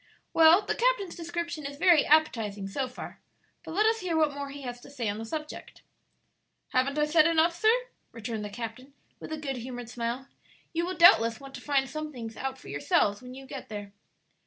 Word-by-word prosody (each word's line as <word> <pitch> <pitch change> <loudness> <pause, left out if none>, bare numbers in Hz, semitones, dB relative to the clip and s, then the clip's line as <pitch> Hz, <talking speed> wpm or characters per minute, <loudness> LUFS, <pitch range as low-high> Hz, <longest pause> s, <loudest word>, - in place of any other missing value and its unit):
Well, 330 +5 +7
the - - -1
captain's 465 -7 +1
description 340 -2 -4
is 280 0 -6
very 335 -2 +5
appetizing 225 -10 +2
so 260 +7 -2
far, 250 - -9 0.4
but 320 - -7
let 425 +2 +3
us 450 +1 +3
hear 355 -4 -1
what 305 -2 +3
more 280 0 -5
he 280 0 -9
has 245 -1 -6
to - - -13
say 255 -5 -4
on 205 +1 -2
the 225 - -5
subject." 305 +5 -7 0.9
"Haven't 265 +3 +1
I 300 - +3
said 310 +1 +5
enough, 335 +1 +3
sir?" 435 +5 +3 0.4
returned 225 -1 -5
the 210 - -5
captain, 240 +5 -7 0.2
with - - -9
a 315 - -2
good 275 -4 -4
humored 245 -1 -7
smile. 240 +2 -4 0.5
"You 340 +1 0
will 370 - -4
doubtless 230 - +6
want 275 -1 -11
to - - -8
find 275 -2 +1
some 310 +1 -5
things 230 -4 -7
out 265 0 -4
for - - -15
yourselves 145 - +1
when 250 0 -10
you 270 0 -10
get 270 -1 -8
there." 205 -2 -7
275 Hz, 205 wpm, -28 LUFS, 235-320 Hz, 0.9 s, Well